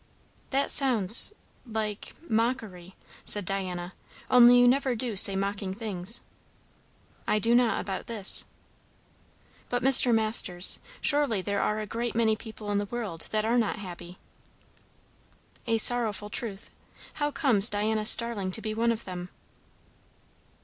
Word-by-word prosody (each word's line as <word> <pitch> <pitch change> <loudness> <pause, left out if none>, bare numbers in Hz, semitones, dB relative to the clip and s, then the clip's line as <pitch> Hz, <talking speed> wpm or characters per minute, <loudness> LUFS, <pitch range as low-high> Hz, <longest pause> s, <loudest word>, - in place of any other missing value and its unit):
"That 275 +1 0
sounds 235 - +6 0.3
like 215 -3 -6
mockery," 220 -6 -3 0.3
said 205 -2 0
Diana. 180 -2 -5 0.4
"Only 245 0 +6
you 245 - +4
never 260 0 +1
do 230 -1 -4
say 195 0 +4
mocking 195 0 -4
things." 210 -1 -5 1.1
"I - - +1
do 225 +3 +2
not 240 -3 +2
about 190 -1 -6
this." 215 -4 -1 1.2
"But, 245 0 -3
Mr. 260 -2 +5
Masters! 215 -5 +3 0.2
surely 285 -10 0
there 200 0 -2
are 210 0 -2
a 215 - -5
great 230 +2 -5
many 225 -1 +1
people 215 -1 -9
in 205 - 0
the 205 - -3
world 205 -7 -7
that 215 0 -2
are 235 +2 +1
not 220 - -1
happy?" 180 -3 -10 1.5
"A 225 -1 +1
sorrowful 220 -3 +3
truth. 210 -4 -7 0.5
How 290 - 0
comes 240 -8 +4
Diana 215 +1 -2
Starling 230 -5 +2
to - - -4
be 215 -1 -5
one 230 +2 0
of 230 0 -6
them?" 180 -1 -8
215 Hz, 135 wpm, -26 LUFS, 195-235 Hz, 1.5 s, sounds